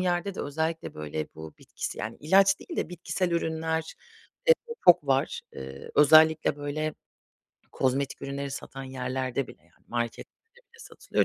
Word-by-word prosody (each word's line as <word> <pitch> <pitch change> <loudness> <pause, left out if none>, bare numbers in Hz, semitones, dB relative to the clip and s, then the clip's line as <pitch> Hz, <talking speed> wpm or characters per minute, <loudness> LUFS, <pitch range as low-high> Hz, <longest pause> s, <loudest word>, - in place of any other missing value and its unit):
yerde 180 +1 0
de - - -4
özellikle 160 +3 -2
böyle 75 0 -4
bu 80 0 -9
bitkisi - - -6
yani, 110 +2 -4
ilaç 195 +5 +5
değil 340 - -8
de - - -1
bitkisel 180 +1 -2
ürünler, 160 -1 -1 0.5
eee, 485 - +8 0.3
çok 170 -4 +7
var. 135 0 +1
Eee, 65 0 -8
özellikle 155 +1 +6
böyle 150 +1 -3 0.8
kozmetik 135 +1 0
ürünleri 140 0 -4
satan 135 0 -7
yerlerde 130 0 -2
bile, - - -14
yani, - - -30
marketlerde 120 - -5 0.2
bile 465 - -19
satılıyor - - -1
145 Hz, 145 wpm, -28 LUFS, 130-165 Hz, 0.8 s, eee